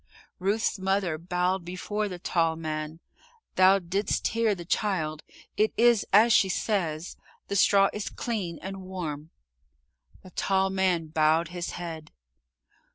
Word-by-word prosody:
Ruth's 200 +2 0
mother 190 -4 0
bowed 180 +2 -1
before 205 +4 -3
the 180 - -6
tall 165 -2 0
man. 155 0 -5 0.5
"Thou 185 +1 +6
didst 195 +2 -1
hear 225 -2 +1
the 175 -2 -9
child. 165 -6 -1 0.4
It 215 +1 +2
is 235 -2 +4
as 220 +4 +6
she 190 - +4
says 175 -5 -2 0.3
the 200 - -2
straw 195 0 +5
is 210 - -4
clean 195 -8 -4
and 195 0 -6
warm." 165 -5 -6 0.9
The 185 - -13
tall 190 +1 +1
man 185 -3 +1
bowed 160 +1 +2
his 175 0 -5
head. 165 -3 -7
185 Hz, 135 wpm, -27 LUFS, 165-200 Hz, 0.9 s, Thou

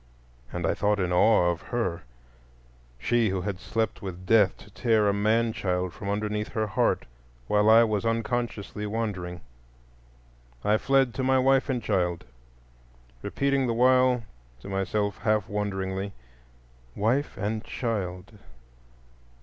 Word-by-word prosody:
And 90 -1 -3
I - - +2
thought 105 0 +1
in 90 -1 0
awe 90 -1 +4
of 85 - -5
her,—she - - -4
who 95 -1 -1
had 95 -1 -4
slept 110 +2 -2
with 95 -2 -7
Death 105 -3 +4
to 105 - -16
tear 110 -1 +2
a 100 - +3
man 110 +3 +2
child 90 -3 -2
from 100 - -6
underneath 105 +1 -1
her 110 -1 0
heart, 105 - 0 0.4
while 105 - +3
I 115 +1 +8
was 105 -3 0
unconsciously 115 -2 -2
wandering. 95 -6 -3 1.2
I 105 +1 +3
fled 135 -3 +2
to 130 - -3
my 130 0 +3
wife 135 +2 +3
and 125 -4 -1
child, 90 -4 0 1.0
repeating 140 -1 0
the 115 - 0
while 125 0 +4 0.4
to - - -9
myself 100 +1 -1
half 110 -1 +1
wonderingly, 100 -1 -3 0.8
"Wife 125 +8 0
and 110 +2 -2
child? 100 -3 -4
105 Hz, 135 wpm, -27 LUFS, 90-115 Hz, 1.2 s, I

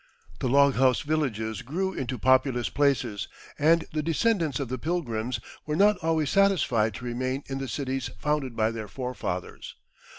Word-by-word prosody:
The 130 - -1
log 140 +1 +5
house 130 -1 +4
villages 110 -9 -1
grew 190 +9 -2
into 130 -4 -3
populous 130 0 +2
places, 130 -8 0 0.3
and 160 +2 +4
the 155 - 0
descendants 165 - +1
of 140 - -2
the 130 +1 -4
"Pilgrims" 125 -8 -2 0.3
were 150 - -1
not 205 +4 +5
always 160 -3 +1
satisfied 170 - +3
to 125 - -7
remain 130 +3 -2
in 135 0 -4
the 135 - -4
cities 130 0 -3
founded 150 -5 -1
by 110 0 +1
their 110 -2 -6
forefathers. 125 +3 -5
135 Hz, 160 wpm, -27 LUFS, 120-155 Hz, 0.3 s, log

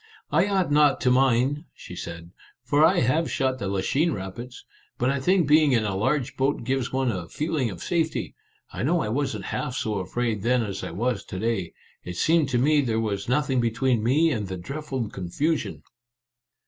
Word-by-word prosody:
" - - -28
I 195 - +3
ought 190 -6 +1
not 145 -1 +4
to 125 - +3
mind," 135 +4 +2
she 90 - -10
said, 85 0 -8 0.2
" 120 - -31
for 145 +2 +4
I - - +5
have 140 +7 +1
shot 130 -2 0
the 100 - -3
Lachine 135 - +1
Rapids. 110 +6 -7 0.3
But 125 +2 +1
I 140 - -1
think 180 +4 +3
being 150 -1 +5
in 115 -3 +2
a 100 -2 -1
large 130 +6 0
boat 135 -1 0
gives 130 +1 -1
one 130 -2 +1
a 90 -5 -5
feeling 150 -5 -1
of 90 -4 -8
safety. 165 -3 -1 0.4
I - - -4
know 165 +6 +2
I - - -2
wasn't 135 +4 -2
half 135 -4 -3
so 105 -5 -1
afraid 110 +3 -2
then 120 +2 +2
as 100 -3 -5
I - - -4
was 115 +5 -2
to 95 - -7
day. 105 -4 -2 0.3
It 90 0 -7
seemed 160 -3 +3
to 125 - +1
me 145 +4 +4
there 115 -4 0
was 105 -1 -2
nothing 130 -1 +1
between 120 +1 +1
me 150 +8 +3
and 105 -7 -2
the 95 0 -5
dreadful 135 - -4
con 90 -2 -6
fusion." 155 - -1
125 Hz, 205 wpm, -25 LUFS, 110-145 Hz, 0.4 s, I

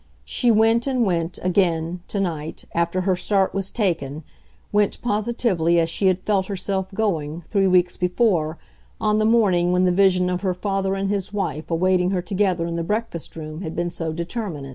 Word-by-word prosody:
She 245 - 0
went 225 +2 +4
and 255 -3 +1
went, 170 -2 -1
again, 175 -2 +1
to 200 - -3
night, 160 -5 -3
after 170 +2 0
her 185 0 +1
start 195 +1 +1
was 195 -1 -2
taken; 165 - -2 0.5
went, 205 -1 +1
positively, 210 -7 +1
as 165 0 +1
she 195 - +1
had 185 -1 +3
felt 190 0 0
herself 190 -1 -2
going, 170 -6 -2
three 195 -2 +2
weeks 180 -1 +3
before, 180 -4 +1 0.4
on 215 0 +2
the 215 - +2
morning 195 -6 +3
when 180 +1 +3
the 180 - +3
vision 185 -1 +3
of 180 0 -1
her 185 -3 0
father 195 0 -1
and 195 0 -1
his 195 -2 -2
wife 160 -7 -3
awaiting 180 +2 +2
her 185 -2 0
together 185 -2 0
in 170 0 -3
the 170 - -1
breakfast 210 -2 -3
room 155 +1 -7
had 160 -4 -5
been 175 0 -1
so 165 -2 -3
determinant. 170 - -4
185 Hz, 185 wpm, -22 LUFS, 170-200 Hz, 0.5 s, went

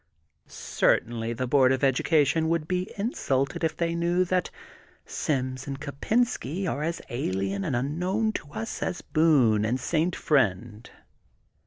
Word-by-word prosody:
Certainly 115 0 0
the 125 +2 -2
Board 130 0 +4
of 130 - 0
Edu 135 -2 +2
cation 160 +1 +2
would 165 -2 0
be 180 +1 -2
insulted 140 - -1
if 160 - 0
they 170 -1 0
knew 175 +2 +1
that 180 0 0 0.6
Sims 130 -2 -2
and 135 -1 -5
Kopensky 185 - -1
are 150 -4 -2
as 165 +2 -3
alien 100 -4 -2
and 130 - -1
unknown 180 - 0
to 145 -8 -7
us 110 -4 -5
as 180 - -2
are - - -32
Boone 135 -10 +4
and 120 +4 0
Saint 165 +5 0
Friend. 115 - 0
145 Hz, 150 wpm, -26 LUFS, 125-170 Hz, 0.6 s, Board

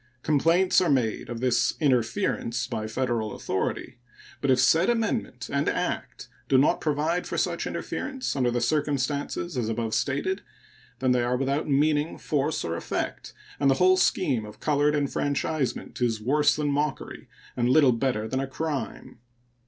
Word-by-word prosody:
Complaints 165 +6 +3
are 180 - +1
made 125 -7 0
of 120 -1 -5
this 120 -2 +2
interference 125 - 0
by 110 0 -4
Federal 115 -2 -2
authority; 105 +6 -3 0.4
but 140 - 0
if 130 -1 +4
said 160 - +4
amendment 225 - -1
and 140 0 +1
act - - -3 0.2
do 135 - +5
not 135 - +3
provide 155 +4 0
for - - -4
such - - -1
interference 265 - -4
under 125 -3 +2
the 120 0 -1
circumstances 145 +4 -1
as 120 -3 -1
above 115 -1 -2
stated, 165 +8 -1 0.6
then 130 0 +1
they 125 -1 +3
are 120 +1 0
without 140 +3 -1
meaning, 150 +2 +2
force, 150 +1 -1
or 85 0 -2
effect, - - -4 0.3
and 140 - +3
the 135 - +4
whole 185 +5 +5
scheme 145 -9 +1
of 105 0 -11
colored 150 0 +2
enfranchisement 145 -1 -2
is 115 -3 +1
worse 145 +7 +3
than 150 -1 -1
mockery 145 0 -3 0.3
and 120 0 +1
little 140 -1 +6
better 115 -2 -1
than 130 +3 -2
a 135 - -2
crime. 145 -4 -5
135 Hz, 160 wpm, -26 LUFS, 120-150 Hz, 0.6 s, little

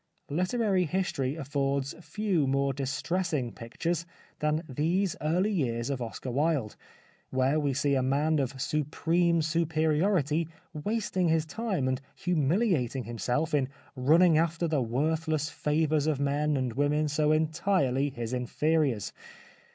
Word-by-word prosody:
Literary 185 +3 +1
history 155 -6 -1
affords 140 -1 -1
few 190 -6 0
more 135 0 +1
distressing 140 +1 -1
pictures 165 +10 -3 0.3
than 150 +2 0
these 165 +7 0
early 180 +7 +1
years 120 - -1
of 135 -2 -3
Oscar 120 +2 -5
Wilde, 140 -4 0 0.5
where 130 +3 +2
we 145 -2 +1
see 140 +1 +1
a 135 - +2
man 145 +4 +1
of 135 -1 -2
supreme 165 +4 +1
superiority 160 0 +1 0.3
wast 210 +8 -3
ing 180 -2 +3
his 160 -1 +2
time 195 - -2
and 130 0 -1
humiliating 165 - +1
himself 125 +7 -2
in 135 -3 +2 0.3
running 155 +5 +5
after 165 +1 0
the 155 -4 +1
worthless 155 +5 0
favours 150 0 +1
of 150 -3 +1
men 145 +1 +1
and 130 -3 -1
women 145 +3 +1
so 150 +1 +1
entirely 155 -3 +1
his 120 -3 -5
inferiors. 135 -1 0
150 Hz, 130 wpm, -29 LUFS, 135-165 Hz, 0.5 s, running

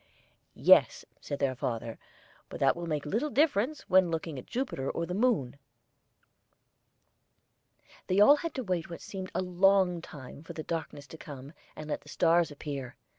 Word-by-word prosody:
"Yes," - - +5
said 145 - -5
their 135 -2 0
father, 115 -2 -4 0.5
"but - - -8
that 135 -1 +3
will 170 0 -5
make 150 -2 -2
little 225 - -1
difference 285 -1 +1
when 185 -1 +3
looking 160 -3 -3
at - - -12
Jupiter 240 - -3
or 170 - -2
the 180 - -5
moon." 190 - 0 2.5
They 185 +2 +2
all 280 +8 +8
had 335 +2 -5
to 260 - -3
wait 180 -6 -2
what 170 - -8
seemed 190 -1 -7
a - - 0
long 185 -1 +3
time 140 -4 -11
for 165 - -9
the 155 - -6
darkness 160 -4 -5
to 160 +3 -12
come, 140 0 -10 0.2
and 155 - -8
let 150 - -3
the - - -16
stars 170 0 +3
appear. 140 -3 -6
170 Hz, 170 wpm, -30 LUFS, 145-195 Hz, 2.5 s, all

